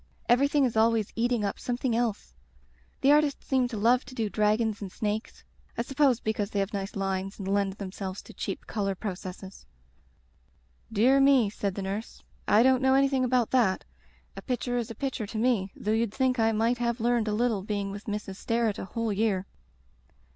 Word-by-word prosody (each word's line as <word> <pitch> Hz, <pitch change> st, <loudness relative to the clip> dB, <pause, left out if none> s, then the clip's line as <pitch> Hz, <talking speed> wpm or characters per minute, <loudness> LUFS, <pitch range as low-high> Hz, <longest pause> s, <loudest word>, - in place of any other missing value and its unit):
Everything 280 Hz, +3 st, +4 dB
is 240 Hz, -, -2 dB
always 220 Hz, -1 st, +2 dB
eating 235 Hz, -2 st, +1 dB
up 200 Hz, -, -3 dB
something 245 Hz, -1 st, -1 dB
else. 230 Hz, -3 st, -2 dB, 0.7 s
The 275 Hz, -, +5 dB
art 300 Hz, +1 st, +6 dB
ists 285 Hz, -2 st, -3 dB
seem 260 Hz, -2 st, +2 dB
to 235 Hz, -3 st, -6 dB
love 240 Hz, +4 st, +3 dB
to 255 Hz, +1 st, -11 dB
do 220 Hz, -4 st, -2 dB
dragons 215 Hz, 0 st, +1 dB
and 195 Hz, -2 st, -6 dB
snakes. 215 Hz, +2 st, -4 dB, 0.3 s
I 235 Hz, -, 0 dB
suppose 270 Hz, -2 st, +2 dB
because 215 Hz, -3 st, -2 dB
they 205 Hz, -, -2 dB
have 195 Hz, +2 st, -1 dB
nice 195 Hz, 0 st, -4 dB
lines 195 Hz, 0 st, -2 dB
and 195 Hz, -, -6 dB
lend 200 Hz, 0 st, +1 dB
themselves 190 Hz, -1 st, -6 dB
to -, -, -13 dB
cheap -, -, -5 dB
color 195 Hz, -3 st, -2 dB
processes.*' 190 Hz, -1 st, -7 dB, 1.2 s
"Dear 245 Hz, +6 st, +4 dB
me/' 270 Hz, -6 st, +5 dB
said 200 Hz, -2 st, -3 dB
the 200 Hz, -, -4 dB
nurse, 200 Hz, +4 st, -5 dB, 0.2 s
"I 215 Hz, +3 st, +5 dB
don't 260 Hz, 0 st, +4 dB
know 265 Hz, 0 st, +4 dB
anything 270 Hz, -1 st, +3 dB
about 250 Hz, -2 st, +1 dB
that. 230 Hz, -8 st, +2 dB, 0.5 s
A -, -, -7 dB
picture 245 Hz, -1 st, -2 dB
is 235 Hz, -, -4 dB
a 230 Hz, -, -7 dB
picture 260 Hz, -4 st, -3 dB
to 220 Hz, -, -6 dB
me, 220 Hz, -5 st, +1 dB
though 210 Hz, -, -2 dB
you'd 225 Hz, -1 st, +1 dB
think 260 Hz, -2 st, +1 dB
I 225 Hz, 0 st, +3 dB
might 230 Hz, +2 st, +1 dB
have 235 Hz, 0 st, -1 dB
learned 235 Hz, -1 st, +1 dB
a -, -, 0 dB
little 225 Hz, -2 st, +1 dB
being 200 Hz, 0 st, -3 dB
with 200 Hz, +1 st, -8 dB
Mrs. 205 Hz, -2 st, -4 dB
Sterret 230 Hz, -2 st, 0 dB
a -, -, -4 dB
whole 225 Hz, +2 st, -2 dB
year." 200 Hz, -2 st, 0 dB
225 Hz, 195 wpm, -28 LUFS, 200-245 Hz, 1.2 s, art